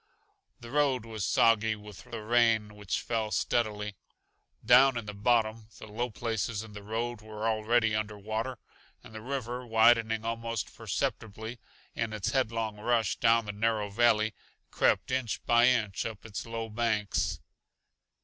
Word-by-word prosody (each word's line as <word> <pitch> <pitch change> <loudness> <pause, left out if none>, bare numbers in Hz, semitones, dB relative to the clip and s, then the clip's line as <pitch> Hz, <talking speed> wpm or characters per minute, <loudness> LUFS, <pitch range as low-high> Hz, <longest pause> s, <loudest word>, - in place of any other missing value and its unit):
The 120 0 -10
road 135 -5 +2
was 110 -3 -3
soggy 110 -1 +3
with 105 -2 -12
the 115 -2 -7
rain 115 -2 +3
which 105 -2 -3
fell 110 -2 -1
steadily; 105 0 -1 0.7
down 125 +2 +6
in 115 - -4
the 105 - -6
bottom, 110 +1 +1
the - - -10
low 115 +4 -3
places 110 -1 -2
in 110 -1 -12
the 105 - -8
road 115 +2 -3
were 110 0 -4
already 110 0 +2
under 105 0 -2
water, 110 +5 -3 0.5
and - - -14
the 110 - -7
river, 125 0 -4
widening 115 -1 +3
almost 115 -1 -3
perceptibly 110 +2 -3 0.3
in 115 -1 -2
its 105 -3 -2
headlong 115 -5 -1
rush 115 -1 +1
down 115 -1 +3
the 105 - -3
narrow 105 0 0
valley, 110 0 +3 0.4
crept - - +2
inch 130 -4 -1
by 120 +1 +5
inch 110 -6 +1
up 110 -2 -9
its 110 +1 -6
low 115 -1 -4
banks. 110 -2 0
110 Hz, 150 wpm, -29 LUFS, 105-120 Hz, 0.7 s, down